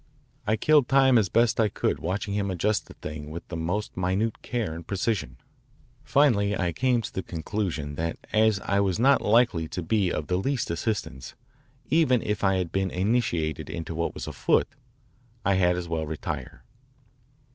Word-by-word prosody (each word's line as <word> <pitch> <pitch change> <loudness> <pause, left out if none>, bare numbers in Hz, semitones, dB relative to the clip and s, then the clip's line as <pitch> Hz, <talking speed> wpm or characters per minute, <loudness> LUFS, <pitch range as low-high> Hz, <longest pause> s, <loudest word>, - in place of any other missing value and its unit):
I 110 - +3
killed 145 +3 +4
time 135 -3 +5
as 100 -4 0
best 115 -1 +2
I 110 -2 +4
could - - -1
watching 100 +4 -2
him 100 -1 -1
adjust 100 +4 0
the - - -13
thing 75 -1 -7
with 85 +2 -8
the 85 - -5
most 90 +6 -2
minute 95 +5 -1
care 115 -9 -2
and 85 0 -9
precision. 100 +2 -2 0.7
Finally 115 -9 +3
I 90 -2 0
came 125 +3 +1
to - - -6
the 95 - -2
conclusion 85 -4 -3
that 85 +1 -2 0.2
as 110 -2 +4
I 100 - 0
was 95 -3 +1
not 135 +2 +4
likely 105 -7 +3
to 90 - -5
be 95 +1 +1
of 75 - -2
the 90 - 0
least 125 0 -1
assistance, 85 - -3 0.6
even 135 -7 +3
if 105 0 -2
I 95 -1 +3
had 90 -3 -2
been 95 0 0
initiated 90 -6 -1
into 80 0 -5
what 85 +1 -2
was - - -5
afoot, - - +1 0.8
I 100 - +4
had 90 -2 +3
as 90 -1 -4
well 80 -2 -2
retire. 80 0 -5
100 Hz, 180 wpm, -26 LUFS, 85-115 Hz, 0.8 s, time